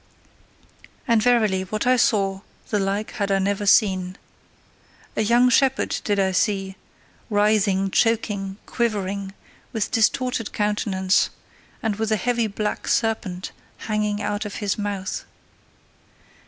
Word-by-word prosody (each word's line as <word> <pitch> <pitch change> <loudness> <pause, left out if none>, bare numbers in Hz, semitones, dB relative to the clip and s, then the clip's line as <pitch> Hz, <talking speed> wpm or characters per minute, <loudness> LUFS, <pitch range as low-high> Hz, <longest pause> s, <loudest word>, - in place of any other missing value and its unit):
And 230 -3 +4
verily, 220 -5 +3
what 210 +4 -3
I 255 +1 +5
saw, 195 -5 +1 0.3
the 210 - +1
like 200 +2 -1
had 200 -1 -2
I 195 - +3
never 200 +1 -1
seen. 190 -4 +3 1.0
A - - +1
young 240 +3 +4
shepherd 265 +1 +2
did 205 -1 0
I 190 -1 +2
see, 195 0 0 0.5
writhing, 205 -2 +2
choking, 205 -4 0
quivering, 200 -4 -2 0.4
with 225 -4 -2
distorted 240 0 +1
countenance, 205 -2 +1 0.5
and 215 -3 -1
with 220 0 -1
a 215 - +3
heavy 235 0 0
black 210 +1 -3
serpent 210 -5 -1 0.3
hanging 210 -1 -2
out 205 0 -2
of 210 -2 -6
his 205 -3 -1
mouth. 205 -2 -3
210 Hz, 125 wpm, -23 LUFS, 195-225 Hz, 1.0 s, I